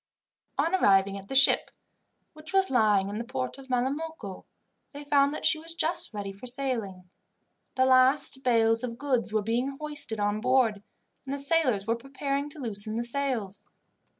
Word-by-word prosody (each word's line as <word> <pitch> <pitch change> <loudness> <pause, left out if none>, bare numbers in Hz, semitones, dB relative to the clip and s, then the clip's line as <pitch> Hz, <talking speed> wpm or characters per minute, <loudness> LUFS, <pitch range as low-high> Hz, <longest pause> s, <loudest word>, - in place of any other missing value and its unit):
On 335 - 0
arriving 195 - +3
at 195 - -14
the 270 - -5
ship, 275 +1 +5 0.6
which 310 +4 -10
was 385 -3 +3
lying 210 -6 +3
in 205 +2 -5
the - - -3
port 255 +2 -5
of 265 -1 -13
Malamocco, 260 -4 -3 0.5
they 285 +1 -8
found 285 -1 +3
that 305 - -5
she 310 - +4
was 330 +1 -5
just 335 +1 -1
ready 200 -2 -6
for 200 +6 -10
sailing. 230 -8 0 0.7
The 260 - +3
last 260 +1 +3
bales 225 -2 +3
of 235 -2 -4
goods 255 -6 -1
were 215 -1 0
being 245 +5 -2
hoisted 295 -7 -2
on 205 +1 -1
board, 250 -5 +2 0.4
and 270 - -7
the 280 - -2
sailors 280 -8 +1
were 230 +1 0
preparing 275 +3 -4
to 300 - -12
loosen 215 -3 -3
the 235 - -1
sails. 240 -6 -2
255 Hz, 175 wpm, -27 LUFS, 215-280 Hz, 0.7 s, ship